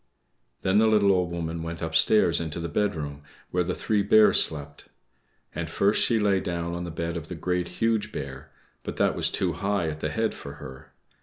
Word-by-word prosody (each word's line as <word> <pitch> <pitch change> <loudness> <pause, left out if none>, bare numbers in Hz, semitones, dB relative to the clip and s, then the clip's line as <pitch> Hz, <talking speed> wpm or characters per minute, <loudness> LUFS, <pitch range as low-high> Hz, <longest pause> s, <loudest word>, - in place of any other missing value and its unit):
Then 95 +2 +3
the 110 - +4
little 105 -2 +4
Old 90 -2 +1
Woman 85 -1 -4
went 85 0 -5
upstairs 85 +3 +3
into 80 0 -4
the 85 - -3
bedroom, 80 -7 -2 0.3
where 90 0 +1
the 90 +1 -3
three 105 -2 0
Bears 105 +2 +5
slept. 70 -2 -6 0.7
And 80 0 -4
first 100 +5 +2
she 115 - +3
lay 100 -3 +2
down 85 -1 -3
on 85 0 -4
the - - -5
bed 85 +1 -4
of 80 -2 -7
the 90 - -6
Great, 90 +1 -1
Huge 115 -1 0
Bear, 65 -1 -7 0.3
but - - -7
that - - +2
was - - +2
too 90 -3 -1
high 100 -1 -1
at 75 0 -6
the 75 - -2
head 110 +5 -1
for 70 - -9
her. 65 -2 -11
85 Hz, 205 wpm, -26 LUFS, 80-100 Hz, 0.7 s, Bears